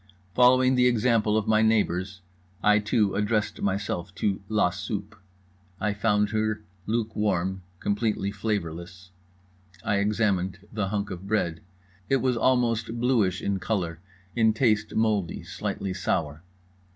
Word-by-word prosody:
Following 130 +2 +5
the 125 -1 +4
example 115 -2 +2
of 110 - -1
my 110 0 +4
neighbours, 95 -4 +1 0.4
I 105 0 +5
too 105 -1 +1
addressed 105 +1 0
myself 100 -2 -2
to 100 0 -1
La 105 -4 +2
Soupe. 105 +2 -5 0.6
I 105 0 0
found 105 -1 +1
her 110 -1 -1 0.2
luke 110 0 -1
warm, 95 -2 0 0.2
completely 105 -1 -1
flavourless. 90 -3 -4 0.7
I 105 - +1
examined 100 -3 +1 0.2
the 105 -2 -1
hunk 100 0 -2
of 95 +1 -7
bread. 85 -6 0 0.5
It 135 - +4
was 130 -1 +1
almost 115 -2 +1
bluish 115 -7 +1
in 100 -1 0
colour; 90 -5 -2 0.4
in 110 -2 +4
taste 110 -2 +1
mouldy, 105 -6 0
slightly 95 -1 -4
sour. 80 -6 -2
105 Hz, 130 wpm, -26 LUFS, 95-110 Hz, 0.7 s, Following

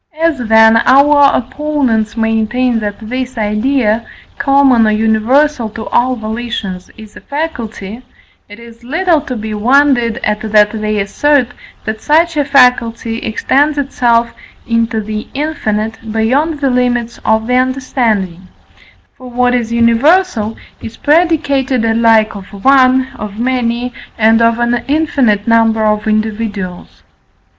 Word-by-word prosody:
As, 330 -3 +1
then, 225 -1 +4
our 280 +4 +4
opponents 255 -5 -2
maintain 225 +2 0
that 205 -1 -4
this 255 +1 -5
idea, 220 +1 0 0.4
common 275 -5 +3
or - - +2
universal 225 +4 +1
to 220 +1 -8
all 255 +1 +1
volitions, 220 -4 -5
is 220 -1 -13
a - - -12
faculty, 240 -8 -6 0.5
it 205 - -11
is 235 0 -15
little 325 +4 0
to 255 - -6
be 220 -1 -5
wondered 240 +1 +2
at 210 0 -1
that 210 -1 +4
they 215 -1 -2
assert, 255 +6 +1 0.4
that 220 0 -4
such 325 +2 +2
a 295 - +1
faculty 245 -4 +2
extends 285 +7 0
itself 240 -4 0 0.3
into 230 -1 -1
the 215 0 -6
infinite, 220 -8 -3
beyond 275 +8 0
the 275 -2 +1
limits 245 -1 -1
of 220 0 +1
the 250 - -2
understanding: 240 -8 -1 0.7
for 255 -1 -12
what 245 0 0
is 235 -2 -1
universal 235 - +2 0.2
is 225 - -9
predicated 280 -6 +1
alike 225 -1 +2
of 195 -1 -9 0.2
one, 260 -1 +4
of 210 -1 -7
many, 245 0 -2 0.2
and 225 0 +3
of 230 0 +2
an 240 0 -1
infinite 275 -8 0
number 225 -1 +2
of 210 0 0
individuals. 215 -4 -4
235 Hz, 130 wpm, -13 LUFS, 220-265 Hz, 0.7 s, then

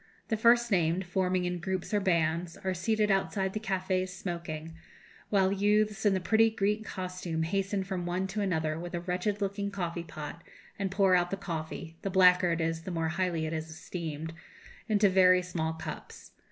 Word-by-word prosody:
The 220 - +2
first 235 +1 +4
named, 175 0 +2
forming 180 0 0
in 180 0 -2
groups 190 +3 -3
or 205 - +4
bands, 170 -2 0
are 190 0 0
seated 210 +3 +1
outside 195 0 0
the 215 - -2
cafés 185 -2 -1
smoking, 170 -4 -5 0.5
while 195 -2 +3
youths 210 +1 +2
in 195 - +4
the - - +1
pretty 225 +4 +4
Greek 210 0 0
costume 180 -4 -4
hasten 195 +3 -1
from 185 -2 -4
one 180 +2 -1
to 210 +2 -2
another 160 -5 0
with 175 0 -5
a - - -1
wretched 180 +4 -2
looking 200 0 -1
coffee 175 -4 -3
pot 160 0 -8 0.4
and 195 -1 0
pour 195 -1 +3
out 175 -1 +3
the 195 - -2
coffee 165 -3 -5
the 195 - -2
blacker 180 -1 +5
it 165 0 0
is 165 0 -1
the 175 - -7
more 165 -2 -1
highly 175 -2 -1
it 160 - -3
is 160 0 -4
esteemed 160 -1 -6 0.6
into 210 -1 +4
very 185 -1 +5
small 160 -3 -2
cups. 160 - -8
185 Hz, 185 wpm, -30 LUFS, 170-195 Hz, 0.6 s, blacker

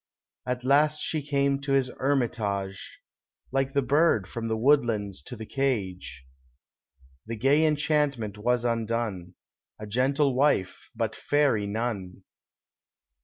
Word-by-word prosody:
At 125 0 -2
last 150 +3 +3
she 155 - -2
came 140 -1 +1
to 140 -1 -1
his 130 -2 +2
hermitage, 110 -8 -2 0.5
Like 135 0 0
the 140 -1 +2
bird 140 - +3
from 115 -1 -5
the 110 0 -1
woodlands 115 - +1
to 125 - -8
the 110 -1 -8
cage; 95 - -3 1.0
The 115 - -4
gay 135 +7 +3
enchantment 145 -8 0
was 120 +2 +1
undone, 115 -6 -2 0.4
A 105 - -7
gentle 135 +6 +1
wife, 125 -8 +1
but 110 -1 -2
fairy 140 -8 +1
none. 100 -4 -4
120 Hz, 120 wpm, -27 LUFS, 105-140 Hz, 1.0 s, last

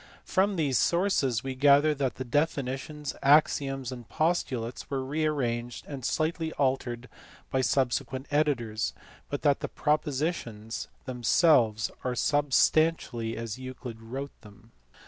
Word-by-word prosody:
From 195 +1 +2
these 145 -7 +1
sources 160 - +2
we 135 0 -3
gather 145 +3 +5
that 135 -5 -1
the 130 - -4
definitions, 145 +1 -2
axioms, 135 -2 +3
and 120 -3 -9
postulates 130 -8 -1
were 135 -2 -2
re 155 +4 -1
arranged 120 -5 -2
and 140 -3 -7
slightly 160 +4 -1
altered 130 -3 -1 0.4
by 130 - +2
subsequent 130 +1 0
editors, 125 -7 0 0.4
but 145 - -4
that 145 -2 +3
the - - -4
propositions 145 -7 -2 0.2
themselves 120 -3 +3
are 125 -1 -1
substantially 145 -4 +2
as 115 +1 -5
Euclid 125 -3 -8
wrote 135 +5 -6
them. 105 +1 -17
135 Hz, 125 wpm, -28 LUFS, 120-150 Hz, 0.4 s, gather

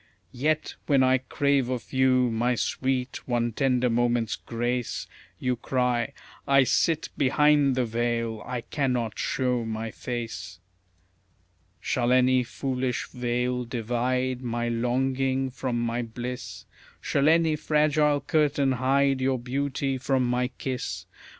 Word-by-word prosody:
Yet, 155 +5 0
when 140 -3 +4
I 130 0 +4
crave 140 0 +1
of 125 0 -4
you, 130 -2 +3
my 120 +2 +1
sweet, 130 +1 -2
one 120 -1 0
tender 125 +1 +1
moment's 120 -1 +1
grace, 120 +1 -3 0.3
You 125 +3 0
cry, 125 +1 0 0.3
"I 140 -1 +6
SIT 160 +4 +1
BEHIND 145 0 +4
THE 130 -1 +1
VEIL, 115 -1 -1
I 125 -1 -4
CANNOT 125 -4 -2
SHOW 125 -2 0
MY 110 0 -4
FACE." 110 -8 -5 1.2
Shall 120 -1 0
any 130 0 +4
foolish 130 0 -3
veil 125 0 -1
divide 125 +2 -1
my 120 -1 -2
longing 130 +2 0
from 125 -2 -2
my 120 +1 -1
bliss? 120 -3 -6 0.3
Shall 140 +2 +2
any 165 -1 +4
fragile 150 -1 +2
curtain 145 -2 +2
hide 135 +1 +2
your 130 0 +1
beauty 135 +2 -2
from 130 0 +1
my 125 +1 +1
kiss? 125 0 -5
125 Hz, 125 wpm, -26 LUFS, 120-135 Hz, 1.2 s, I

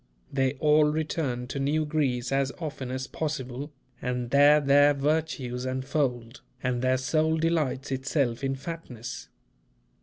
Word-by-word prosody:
They 135 -1 +2
all 150 +1 +4
return 150 -5 -1
to 140 - -3
New 150 +3 +1
Greece 135 -5 0
as 135 0 +1
often 150 -6 -5
as 130 +1 -3
possible, 140 -2 -4 0.3
and 125 -1 -2
there 145 +2 +7
their 145 0 +5
virtues 140 -4 -1
unfold, 130 -2 -2 0.2
and 125 -1 0
"their 130 0 +2
soul 155 +4 +1
delights 155 -5 0
itself 135 -2 -1
in 135 0 0
fatness." 130 -4 -7
135 Hz, 130 wpm, -27 LUFS, 130-150 Hz, 0.3 s, there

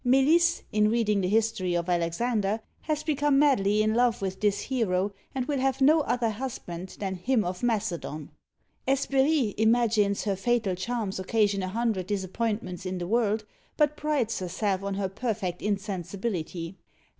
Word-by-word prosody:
Melisse, 305 +7 +4
in 210 0 +3
reading 215 -3 +2
the 180 - 0
"History 210 -3 +1
of 170 0 -1
Alexander," 200 +5 0 0.2
has 305 -1 -1
become 290 -2 +2
madly 215 -8 +3
in 215 0 +1
love 240 0 +2
with 190 -1 -4
this 205 -1 +2
hero, 205 -6 0 0.2
and 260 -2 -1
will 285 -1 -1
have 270 0 +1
no 300 +4 +6
other 245 -5 0
husband 190 -7 -6
than 195 -2 -2
"him 220 +5 +1
of 180 +1 -4
Macedon." 175 -10 -2 0.6
Hesperie 270 -2 +2
imagines 220 -3 +3
her 200 -2 0
fatal 225 -1 +1
charms 205 +1 -3
occasion 200 +1 +1
a 185 - -2
hundred 210 -2 -1
disappointments 205 -1 -2
in 185 0 -3
the 175 - -3
world, 215 0 +1 0.3
but 300 -1 +3
prides 295 -7 -1
herself 190 +1 -1
on 200 0 -3
her 195 -1 -1
perfect 195 -3 -3
insensibility. 190 -3 -3
215 Hz, 155 wpm, -27 LUFS, 190-245 Hz, 0.6 s, no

